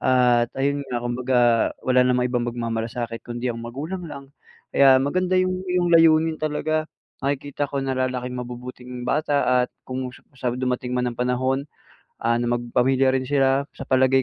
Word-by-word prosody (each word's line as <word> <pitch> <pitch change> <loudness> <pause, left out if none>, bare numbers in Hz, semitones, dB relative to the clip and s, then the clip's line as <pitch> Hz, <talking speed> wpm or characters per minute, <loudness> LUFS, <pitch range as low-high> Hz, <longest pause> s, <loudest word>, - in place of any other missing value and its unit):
At 125 -2 +3
ayun 140 +1 0
nga 125 - -2
kumbaga, 125 +1 0 0.5
wala 130 0 +4
namang 125 0 +2
ibang 120 -1 0
magmamalasakit 115 0 -3
kundi 120 +1 -3
ang 115 - -7
magulang 155 +9 -5
lang 140 -1 -10 0.4
kaya 135 -1 +6
maganda 185 +6 0
yung 185 0 +1
iyong 180 -1 +1
layunin 160 -1 +5
talaga. 155 +1 -1 0.3
Nakikita 145 +1 -2
ko 140 0 -3
na 135 - -2
lalaking 125 -1 -2
mabubuting 125 0 -7
bata 125 -2 +2
at - - -31
kung 130 0 -4 0.3
sa 125 - -4
dumating 125 0 -2
man 125 -1 0
ang 120 - -11
panahon 130 +3 0 0.6
ano 120 +1 +1
magpamilya 130 +2 +2
rin 130 0 -1
sila, 135 0 +2
sa - - -8
palagay 130 0 +3
130 Hz, 155 wpm, -23 LUFS, 125-145 Hz, 0.6 s, kaya